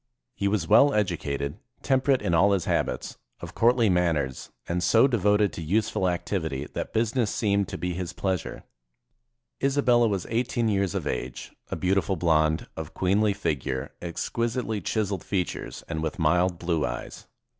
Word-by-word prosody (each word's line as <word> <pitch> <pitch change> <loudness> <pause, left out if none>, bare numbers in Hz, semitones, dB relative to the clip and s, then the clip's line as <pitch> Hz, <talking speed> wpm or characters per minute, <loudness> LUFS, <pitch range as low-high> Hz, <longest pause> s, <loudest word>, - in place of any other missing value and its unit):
He 100 - -1
was 100 -5 0
well 140 - +7
edu 105 -9 +1
cated, 70 +2 -4 0.2
temperate 130 0 +2
in 85 - 0
all 100 +5 +5
his 95 -4 0
habits, - - -2 0.2
of - - -8
courtly 120 0 +3
manners, 85 -8 0 0.2
and 90 +1 -1
so 115 +6 +5
devoted 105 -5 +2
to - - -6
useful 95 +2 +1
activity 80 -6 -2
that - - -4
business 115 0 +1
seemed 100 -3 +1
to - - -5
be 90 0 -2
his 90 0 -4
pleasure. 95 -3 -3 1.0
Isabella 130 -4 +3
was 100 -5 -1
eighteen 115 -1 0
years 100 -4 0
of - - -2
age, 65 0 -4 0.2
a - - -2
beautiful 95 0 +1
blonde, 80 -2 +2
of 80 -1 -7
queenly 100 +3 +2
figure, 75 -9 -2
exquisitely 115 +5 -2
chis 105 +2 -1
eled 95 -4 -2
features, 95 -3 -3
and 80 -2 -3
with 80 -1 -3
mild 90 +3 +2
blue 85 -2 -1
eyes. - - -5
95 Hz, 160 wpm, -26 LUFS, 85-110 Hz, 1.0 s, well